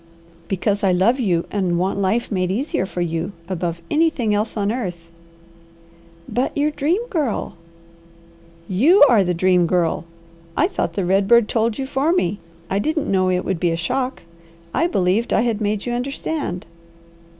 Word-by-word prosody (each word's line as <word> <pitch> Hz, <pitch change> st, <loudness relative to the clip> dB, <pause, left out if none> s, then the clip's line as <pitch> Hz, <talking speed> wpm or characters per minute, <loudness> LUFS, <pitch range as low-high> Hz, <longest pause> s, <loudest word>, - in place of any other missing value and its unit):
"Because 200 Hz, +2 st, -1 dB
I 195 Hz, -, +4 dB
love 200 Hz, +9 st, +3 dB
you, 175 Hz, -8 st, +1 dB
and 185 Hz, -4 st, 0 dB
want 190 Hz, +3 st, 0 dB
life 200 Hz, +6 st, 0 dB
made 185 Hz, -3 st, 0 dB
easier 205 Hz, -, -1 dB
for 180 Hz, -, -4 dB
you, 170 Hz, +3 st, -2 dB
above 170 Hz, -2 st, -3 dB
anything 300 Hz, -9 st, +2 dB
else 210 Hz, +2 st, -1 dB
on 205 Hz, 0 st, 0 dB
earth." 175 Hz, -8 st, -5 dB, 1.2 s
"But 245 Hz, +6 st, -1 dB
your 295 Hz, +1 st, +2 dB
Dream 330 Hz, +10 st, 0 dB
Girl!" 300 Hz, -, -2 dB, 1.1 s
"YOU 285 Hz, -, +5 dB
ARE 230 Hz, -6 st, +5 dB
THE 180 Hz, -1 st, -1 dB
DREAM 180 Hz, 0 st, +3 dB
GIRL! 170 Hz, -1 st, 0 dB, 0.5 s
I -, -, +4 dB
thought 170 Hz, -, -2 dB
the 190 Hz, +1 st, -1 dB
red 195 Hz, +2 st, +2 dB
bird 235 Hz, 0 st, +5 dB
told 225 Hz, -1 st, 0 dB
you 270 Hz, -, -2 dB
for 275 Hz, +4 st, 0 dB
me! 200 Hz, -, 0 dB, 0.3 s
I 195 Hz, -, 0 dB
didn't 310 Hz, +4 st, -1 dB
know 185 Hz, -1 st, +2 dB
it 180 Hz, 0 st, 0 dB
would 190 Hz, -3 st, -1 dB
be 175 Hz, -, +1 dB
a 165 Hz, -, 0 dB
shock. 250 Hz, +11 st, -2 dB, 0.5 s
I 335 Hz, -, +2 dB
believed 195 Hz, -, +1 dB
I -, -, +3 dB
had 230 Hz, -2 st, -1 dB
made 210 Hz, 0 st, -1 dB
you 245 Hz, -, -2 dB
understand." 265 Hz, -, -3 dB
205 Hz, 170 wpm, -21 LUFS, 180-250 Hz, 1.2 s, YOU